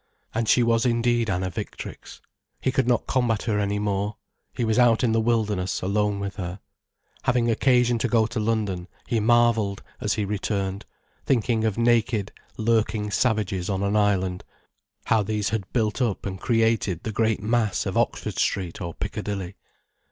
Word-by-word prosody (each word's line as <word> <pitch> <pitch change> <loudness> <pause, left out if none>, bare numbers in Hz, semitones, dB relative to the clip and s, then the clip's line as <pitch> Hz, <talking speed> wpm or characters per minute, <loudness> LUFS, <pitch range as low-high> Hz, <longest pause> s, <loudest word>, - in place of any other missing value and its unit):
And 115 -1 -1
she 125 - +5
was 115 -1 +2
indeed 120 -1 +1
Anna 95 0 -1
Victrix. - - -8 0.4
He 130 - 0
could 130 -2 +1
not 120 -1 +2
combat 120 -5 +1
her 105 -3 0
any 100 0 0
more. 105 +1 -1 0.4
He 120 - -2
was 110 +2 +2
out 120 -1 +4
in 120 - +3
the 115 0 +2
wilderness, 105 -6 0
alone 100 +1 0
with 100 +1 -5
her. 90 0 -5 0.7
Having 120 -1 +2
occasion 125 0 +3
to 115 - +1
go 115 -2 +3
to 115 +1 -3
London, 105 -5 -1 0.2
he 115 - +1
marvelled, 115 -3 +2 0.2
as 105 - 0
he 105 -2 -1
returned, 100 -1 -2 0.4
thinking 115 -3 +2
of 110 -2 0
naked, 115 -3 +2 0.3
lurking 110 -2 +1
savages 105 -5 0
on 95 0 -1
an 100 +1 0
island, 95 -3 +1 0.6
how 110 - +3
these 105 0 -1
had 105 -4 -3
built 110 0 0
up 115 -6 -1
and 95 -1 -5
created 115 -6 +1
the 110 - -3
great 110 -1 0
mass 110 -2 +1
of - - -3
Oxford - - -1
Street 90 -1 -1
or 85 -3 -5
Piccadilly. 95 -2 -4
110 Hz, 165 wpm, -25 LUFS, 100-115 Hz, 0.7 s, she